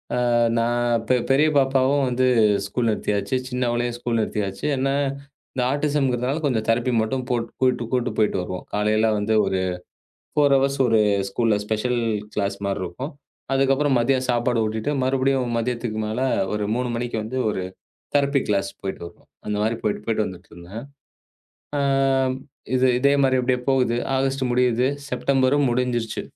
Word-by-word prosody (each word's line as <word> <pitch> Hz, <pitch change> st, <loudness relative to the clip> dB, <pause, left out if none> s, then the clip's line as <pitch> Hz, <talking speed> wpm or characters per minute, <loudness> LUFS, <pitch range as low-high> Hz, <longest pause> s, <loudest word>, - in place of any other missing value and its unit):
ஆ -, -, -1 dB, 0.4 s
நான் 120 Hz, 0 st, +1 dB
பெ 130 Hz, -, +5 dB, 0.2 s
பெரிய 150 Hz, +3 st, +4 dB
பாப்பாவும் 135 Hz, +1 st, +3 dB
வந்து 125 Hz, +1 st, +1 dB, 0.4 s
ஸ்கூல் 115 Hz, +4 st, -1 dB
நிறுத்தியாச்சு. 105 Hz, +3 st, -1 dB
சின்னவளையும் 120 Hz, -1 st, -1 dB
ஸ்கூல் 120 Hz, -1 st, -1 dB
நிறுத்தியாச்சு. 100 Hz, -3 st, -3 dB
ஏன்னா 135 Hz, +1 st, 0 dB, 0.6 s
இந்த 130 Hz, -, -1 dB
ஆட்டிஸம்ங்குறதால 140 Hz, -1 st, 0 dB
கொஞ்சம் 115 Hz, -6 st, 0 dB
தெரப்பி 120 Hz, +2 st, +2 dB
மட்டும் 125 Hz, +4 st, -2 dB
போட்டு, 120 Hz, -2 st, -1 dB
கூட்டு 125 Hz, -2 st, +2 dB
கூட்டு 125 Hz, -1 st, +1 dB
போயிட்டு 105 Hz, -2 st, +2 dB
வருவோம். 90 Hz, 0 st, -6 dB
காலையெல்லாம் 110 Hz, +1 st, +2 dB
வந்து 105 Hz, +2 st, 0 dB
ஒரு 95 Hz, -1 st, 0 dB, 0.7 s
4 145 Hz, -2 st, +4 dB
ஹவர்ஸ் 135 Hz, +1 st, +1 dB
ஒரு 115 Hz, -2 st, +3 dB, 0.3 s
ஸ்கூல் 110 Hz, +2 st, +1 dB
ஸ்பெஷல் 115 Hz, +3 st, -1 dB, 0.3 s
கிளாஸ் 100 Hz, -1 st, -1 dB
மாரி 100 Hz, 0 st, -1 dB
இருக்கும். 125 Hz, -, -6 dB, 0.4 s
அதுக்கப்புறம் 135 Hz, +1 st, +2 dB
மதியம் 130 Hz, +1 st, +1 dB
சாப்பாடு 120 Hz, -1 st, +1 dB
ஊட்டிட்டு 110 Hz, +5 st, -2 dB
மறுபடியும் 130 Hz, -1 st, +1 dB
மதியத்துக்கு 115 Hz, -1 st, -2 dB
மேல 110 Hz, +3 st, -3 dB, 0.3 s
ஒரு 105 Hz, 0 st, -1 dB
3 125 Hz, +1 st, -1 dB
மணிக்கு 120 Hz, -1 st, -3 dB
வந்து 120 Hz, +4 st, -5 dB
ஒரு 95 Hz, -3 st, -2 dB, 0.5 s
தெரப்பி 140 Hz, -1 st, +3 dB
கிளாஸ் 100 Hz, -1 st, +1 dB
போயிட்டு 95 Hz, -2 st, -5 dB
வருவோம். 85 Hz, -, -16 dB, 0.2 s
அந்த 105 Hz, -1 st, -1 dB
மாரி 110 Hz, +2 st, 0 dB
போயிட்டு 105 Hz, -, -1 dB
போயிட்டு 110 Hz, -1 st, 0 dB
வந்துட்டு 90 Hz, -2 st, -10 dB
இருந்தேன். 90 Hz, +6 st, -9 dB, 1.0 s
ஆ -, -, +1 dB, 1.0 s
இது 130 Hz, 0 st, +3 dB
இதே 140 Hz, +2 st, +4 dB
மாரி 130 Hz, -1 st, +3 dB
அப்டியே 125 Hz, 0 st, +1 dB
போகுது. 125 Hz, -3 st, +2 dB, 0.2 s
ஆகஸ்ட் 135 Hz, 0 st, 0 dB
முடியுது. 125 Hz, 0 st, +2 dB, 0.2 s
செப்டெம்பரும் 140 Hz, 0 st, +2 dB
முடிஞ்சிருச்சு. 120 Hz, -2 st, -1 dB
120 Hz, 150 wpm, -23 LUFS, 110-130 Hz, 1.0 s, பெ